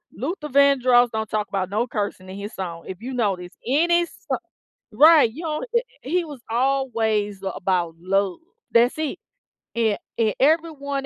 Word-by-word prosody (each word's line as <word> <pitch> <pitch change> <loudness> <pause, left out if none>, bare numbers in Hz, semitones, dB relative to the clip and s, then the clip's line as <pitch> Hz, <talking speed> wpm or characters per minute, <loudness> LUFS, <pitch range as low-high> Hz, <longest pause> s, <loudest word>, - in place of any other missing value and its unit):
Luther 310 -4 -4
Vandross 255 -3 +5
don't 220 -1 -2
talk 210 -1 -2
'bout 190 -2 -2
no 230 +4 0
cursing 205 -4 -4
in 190 - -7
his 205 +2 -7
song, 170 -3 -6
if 190 +2 -7
you 260 +3 -5
notice 195 -6 -1
any 340 +6 +3
so - - -5 0.6
right, 300 0 +7
you 320 +7 -8
know, 305 -2 -3
eh, 470 - +5 0.2
he 345 +6 0
was 285 -5 -9
always 225 -6 0
about 175 -3 -1
love. 195 +1 0 0.3
That's 240 +5 +3
it, 310 -2 -2 0.6
a 220 -3 +2 0.2
and 220 -3 +1
everyone 285 -2 +1
235 Hz, 155 wpm, -23 LUFS, 200-280 Hz, 0.6 s, right